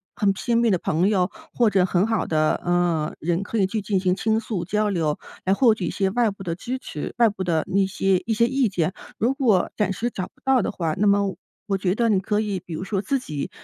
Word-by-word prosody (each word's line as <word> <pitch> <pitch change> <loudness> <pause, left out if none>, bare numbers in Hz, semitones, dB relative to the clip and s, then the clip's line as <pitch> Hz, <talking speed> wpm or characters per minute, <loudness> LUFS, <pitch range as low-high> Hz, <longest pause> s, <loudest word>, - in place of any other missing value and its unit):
很 205 -4 +2
亲 235 +4 0
密 235 -1 +3
的 190 - +3
朋 170 +2 +1
友， 190 -4 +1 0.2
或 235 -3 +3
者 190 -3 +3
很 180 +1 +2
好 225 0 0
的， 155 -1 +1
呃， 175 -3 +1
人， 170 +3 0
可 225 - -4
以 195 - +3
去 215 +3 -2
进 200 -1 0
行 185 -1 +1
倾 220 +2 +1
诉 215 -6 -4
交 210 +3 0
流， 160 -6 0 0.3
来 190 - +3
获 230 +2 +5
取 205 -4 -4
一 - - -1
些 195 -2 0
外 235 +1 +2
部 195 -1 -8
的 170 -3 -2
支 250 +8 -4
持， 150 - -6
外 235 -2 +5
部 200 -2 -5
的 165 -3 +1
那 195 +1 +2
些 195 0 +1
一 225 - 0
些 230 +2 +3
意 265 0 +1
见。 180 -2 -1 0.2
如 240 +4 +1
果 240 -10 +2
暂 210 -3 +1
时 235 +6 -2
找 185 - -4
不 - - -31
到 265 -2 +3
的 - - -2
话， 165 -3 -2
那 210 - +2
么 200 -2 +2 0.3
我 195 -2 +1
觉 185 0 0
得 230 0 +2
你 200 -3 +3
可 210 +2 0
以， 205 -3 -2
比 175 -1 -10
如 160 - -4
说 195 0 -2
自 275 +8 0
己 150 - -5
195 Hz, 275 characters per minute, -23 LUFS, 180-220 Hz, 0.3 s, 获